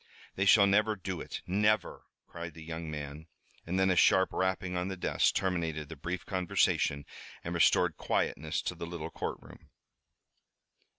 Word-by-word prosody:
"They 95 - 0
shall 100 +1 +7
never 105 +2 +3
do 95 -2 -5
it, - - -7
never!" 105 +3 +1 0.2
cried 85 0 -8
the 80 - -10
young 80 0 -6
man. 75 +1 -6 0.4
And 90 +3 -1
then 95 0 +4
a - - +2
sharp 95 +1 +4
rapping 95 -1 -1
on 90 +1 -1
the 95 -1 -4
desk - - +1
terminated 80 -5 -1
the 80 - -7
brief 85 +5 -5
conversation 90 -5 +1 0.4
and 85 - -4
restored 85 -2 +3
quietness 80 +1 -1
to - - -2
the 85 - -7
little 85 -2 -6
courtroom. - - -7
90 Hz, 160 wpm, -31 LUFS, 80-95 Hz, 0.4 s, shall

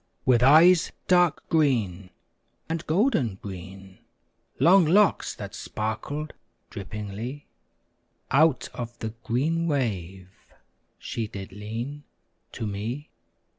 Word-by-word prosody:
With 125 -2 +4
eyes 160 +6 +6 0.2
dark 175 -4 +3
green, 110 - +1 0.6
and 165 0 -3
golden 155 - +2
green 95 0 -10 0.6
Long 185 +2 +6
locks, 190 +6 +3
that - - -8
sparkled 140 +8 -4 0.4
drippingly, 105 +7 -6 0.9
Out 150 -1 +3
of 120 -1 -6
the 110 - -4
green 160 +8 0
wave 95 - -2 0.7
she 115 -2 -4
did 100 -2 -8
lean 115 +8 -6 0.5
To - - -4
me. 110 +8 -5
120 Hz, 95 wpm, -26 LUFS, 100-155 Hz, 0.9 s, eyes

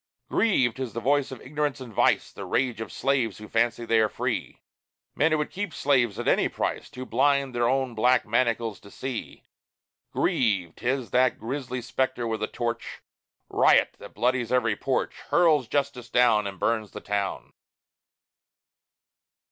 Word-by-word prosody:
Grieve! 130 - +2
'tis 130 -2 -5
the 115 - -3
voice 140 +4 +1
of 130 - -8
ignorance 150 +1 -2
and 125 -4 -9
vice, - - +2
The - - -8
rage 125 -4 -1
of 110 - -6
slaves 135 -6 0
who 105 - -10
fancy 115 +1 0
they 115 -1 +3
are 110 -1 +3
free: - - -3 0.5
Men 155 +2 +2
who 155 - +3
would 150 - -2
keep 205 +1 -3
men - - -13
slaves 120 -7 +2
at - - -4
any - - +3
price, - - -3
Too 130 0 -8
blind 140 +2 +2
their 120 0 +1
own 130 -1 0
black 125 +3 +3
manacles 115 -2 0
to 100 - -15
see. 130 +1 -6 0.7
Grieve! 100 -9 +1
'tis 130 0 -2
that 125 0 +3
grisly 125 0 -4
spectre 130 -1 -1
with 110 -2 -2
a 110 - 0
torch, 120 -1 -4 0.4
Riot - - +4
that - - -12
bloodies 125 -1 0
every 120 -4 +2
porch, 135 +5 -1 0.2
Hurls 155 -7 +4
justice 140 -3 -2
down 115 -4 +3
And 95 -1 -7
burns 110 -3 -1
the - - -6
town. 100 -1 -3
125 Hz, 165 wpm, -26 LUFS, 115-135 Hz, 0.7 s, Riot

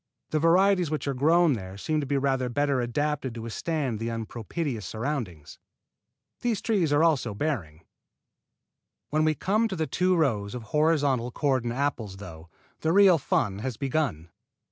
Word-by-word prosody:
The 155 - +1
varieties 180 +1 +4
which 155 -1 -3
are 140 - 0
growing 160 +4 +4
there 95 -4 -6
seem 155 +9 -1
to 145 - -3
be 140 +1 +1
rather 135 -2 0
better 140 0 +1
adapted 135 +1 -2
to 115 - -6
withstand 130 0 -2
the 115 +1 -2
unpropitious 115 - -4
surroundings. 110 - -5 0.8
These 235 -4 0
trees 190 -9 +1
also 145 -6 +3
are - - -11
bearing. 95 - -3 1.3
When 155 +1 +2
we 155 0 +2
come 215 +9 +1
to 195 - -4
the 160 -2 -1
two 180 +3 +1
rows 115 -10 0
of 120 - -6
horizontal 145 -3 +1
cordon 130 -3 0
apples, 120 -7 -2
though, 85 -4 -11 0.3
the 160 - 0
real 190 -3 +6
fun 100 -6 0
has 125 0 -4
begun. 135 - -2
140 Hz, 160 wpm, -27 LUFS, 115-155 Hz, 1.3 s, real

